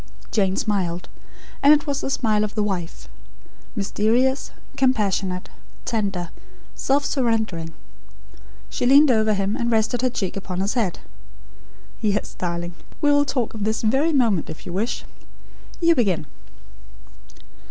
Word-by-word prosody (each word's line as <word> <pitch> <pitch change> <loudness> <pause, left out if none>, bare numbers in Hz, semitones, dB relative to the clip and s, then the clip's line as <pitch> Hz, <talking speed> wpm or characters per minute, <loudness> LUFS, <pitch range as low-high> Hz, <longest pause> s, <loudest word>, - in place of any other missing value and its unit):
Jane 195 -4 +2
smiled; 180 -5 -1 0.5
and 290 +2 +8
it 295 - -2
was 285 -2 -1
the - - -2
smile 215 -5 +1
of 215 - -4
"The 210 - +1
Wife" 185 -5 -4 0.7
mysterious; 230 +6 +1 0.3
compassionate; 200 -7 +1 0.4
tender; 195 -6 -2 0.4
self 280 +2 +1
surrendering. 220 - 0 1.0
She 245 - -1
leaned 280 +2 +7
over 220 -2 +3
him, 200 +2 0
and 235 -2 -1
rested 225 +1 +1
her 255 - +2
cheek 195 -6 -3
upon 185 -2 -4
his 195 +2 0
head. 220 -8 -1 1.0
"Yes, 210 -1 0
darling. 175 -1 -3 0.3
We 290 -1 +3
will 285 0 +4
talk 250 -5 -1
of 215 -2 -4
this 220 +2 -1
very 270 +9 +3
moment, 230 - +2
if 155 - -8
you 175 - -6
wish. 215 +6 -2 0.7
You 335 -1 +5
begin." 195 - +1
215 Hz, 135 wpm, -23 LUFS, 190-255 Hz, 1.0 s, and